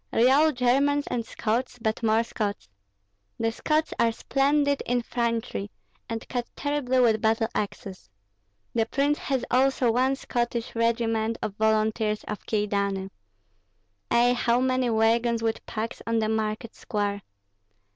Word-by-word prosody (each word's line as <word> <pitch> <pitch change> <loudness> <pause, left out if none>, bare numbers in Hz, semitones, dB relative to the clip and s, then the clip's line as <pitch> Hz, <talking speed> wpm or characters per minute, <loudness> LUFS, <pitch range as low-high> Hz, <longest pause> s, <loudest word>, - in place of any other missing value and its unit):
Real 270 +7 +5
Germans 280 +3 +2
and 235 - -2
Scots, 235 +3 -2
but 220 -1 -2
more 225 0 +3
Scots. 210 - -4 0.7
The 225 0 +1
Scots 310 +6 0
are 230 - +4
splendid 285 +4 +1
infantry, 230 - -1 0.4
and 225 0 -4
cut 245 -1 -3
terribly 285 -3 0
with 225 -3 +3
battle 220 0 +2
axes. 195 -2 -5 0.6
The 225 -1 +1
prince 285 +4 +1
has 265 -3 -1
also 260 -1 +3
one 260 +3 +2
Scottish 240 -2 -2
regiment 230 -1 0
of 205 - -2
volunteers 215 0 +1
of 210 - -7
Kyedani. 200 -2 -1 1.0
Ei, 240 +1 +4
how 240 0 +2
many 255 -1 +1
wagons 230 +1 +2
with 225 0 -1
packs 220 +1 -4
on 230 0 +1
the 215 -1 +1
market 220 +1 -2
square! 205 -1 -2
230 Hz, 130 wpm, -26 LUFS, 220-250 Hz, 1.0 s, Real